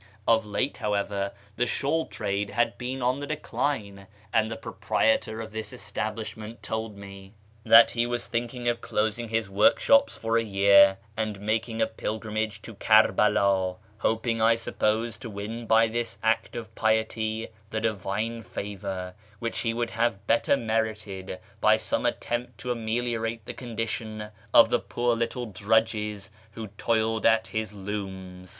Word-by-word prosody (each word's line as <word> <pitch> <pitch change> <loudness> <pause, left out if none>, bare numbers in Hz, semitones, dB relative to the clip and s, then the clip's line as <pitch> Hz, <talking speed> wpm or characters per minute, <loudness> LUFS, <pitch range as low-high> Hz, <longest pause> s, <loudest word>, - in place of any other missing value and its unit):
Of 110 -2 +3
late, 105 +7 -1
how 105 -1 -1
ever, 100 0 -1 0.3
the 125 +1 +1
shawl 155 +6 0
trade 100 -1 -2
had 120 +3 +1
been 130 +1 -3
on 125 +2 +1
the 145 - -5
decline; 110 -10 -3 0.3
and 110 -1 +3
the 115 - -4
pro - - -8
prietor 110 0 +1
of 110 - -9
this 110 -1 -5
establishment 110 +2 -5
told 110 -2 -4
me 100 0 -11 0.3
that 115 +1 +8
he 120 0 0
was 120 0 -2
thinking 120 +1 -3
of 120 -1 +1
closing 110 +2 -1
his 110 -1 0
workshops 190 - +4
for 115 +1 +1
a - - -1
year, 100 -1 +6 0.2
and 110 -2 -2
making 110 +2 0
a - - +4
pilgrimage 110 -1 -3
to 115 - -8
Kerbela, 100 -3 +3 0.2
hoping, 115 0 0
I 115 +1 +5
suppose, 115 0 -1
to 125 - -7
win 110 +3 -6
by 115 +1 +5
this 115 0 -3
act 110 +1 +1
of 110 -2 -6
piety 110 0 0 0.2
the 110 - -2
Divine 110 +1 -2
favour, 95 -3 -5 0.2
which 115 +2 -3
he 115 - 0
would 115 0 -2
have 115 -3 0
better 115 +5 +3
merited 110 -5 -2 0.2
by - - +5
some - - 0
attempt 120 +1 -3
to 125 - -2
ameliorate 115 -1 -2
the - - -5
condition 110 -2 -4 0.2
of 115 0 +8
the 120 - +2
poor 120 0 0
little 115 +1 -2
drudges 105 0 0 0.2
who 110 -1 -7
toiled 110 +2 0
at 115 0 +4
his 110 -2 -3
looms. 95 -2 -6
110 Hz, 155 wpm, -27 LUFS, 105-115 Hz, 0.3 s, that